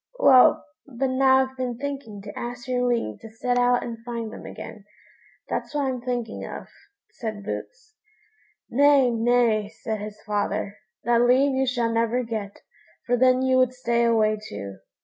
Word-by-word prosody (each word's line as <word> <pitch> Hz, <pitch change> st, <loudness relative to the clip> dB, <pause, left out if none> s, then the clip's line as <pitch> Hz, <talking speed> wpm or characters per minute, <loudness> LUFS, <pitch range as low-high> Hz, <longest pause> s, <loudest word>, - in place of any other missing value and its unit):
"Well, 255 Hz, -2 st, +6 dB, 0.2 s
but 265 Hz, 0 st, -2 dB
now 265 Hz, 0 st, +4 dB
I've 265 Hz, 0 st, -8 dB
been 250 Hz, -2 st, -3 dB
thinking 270 Hz, -7 st, -6 dB
to 205 Hz, -, -9 dB
ask 245 Hz, 0 st, -6 dB
your 250 Hz, -1 st, 0 dB
leave 230 Hz, -, -1 dB
to 225 Hz, -, -11 dB
set 245 Hz, +3 st, -1 dB
out 245 Hz, 0 st, +3 dB
and 230 Hz, -1 st, -7 dB
find 230 Hz, -2 st, -5 dB
them -, -, -9 dB
again; 210 Hz, -, -9 dB, 0.6 s
that's -, -, -4 dB
what 290 Hz, -1 st, +1 dB
I'm 255 Hz, -2 st, -2 dB
thinking 240 Hz, -2 st, -3 dB
of," -, -, -7 dB, 0.5 s
said 215 Hz, -4 st, -6 dB
Boots. 450 Hz, -, -7 dB, 0.7 s
"Nay, 275 Hz, -1 st, +4 dB
nay!" 230 Hz, -2 st, +2 dB
said 220 Hz, 0 st, -5 dB
his 210 Hz, 0 st, -8 dB
father; 205 Hz, -1 st, -2 dB, 0.2 s
"that 235 Hz, 0 st, +3 dB
leave 260 Hz, +3 st, +4 dB
you 265 Hz, 0 st, +1 dB
shall 240 Hz, -2 st, 0 dB
never 230 Hz, +2 st, +1 dB
get, 215 Hz, -4 st, -5 dB, 0.4 s
for 245 Hz, -, +2 dB
then 255 Hz, +1 st, +4 dB
you 260 Hz, 0 st, +3 dB
would 255 Hz, -1 st, +3 dB
stay 235 Hz, -2 st, 0 dB
away 215 Hz, -2 st, +2 dB
too." 100 Hz, -1 st, -7 dB
240 Hz, 170 wpm, -24 LUFS, 220-255 Hz, 0.7 s, Well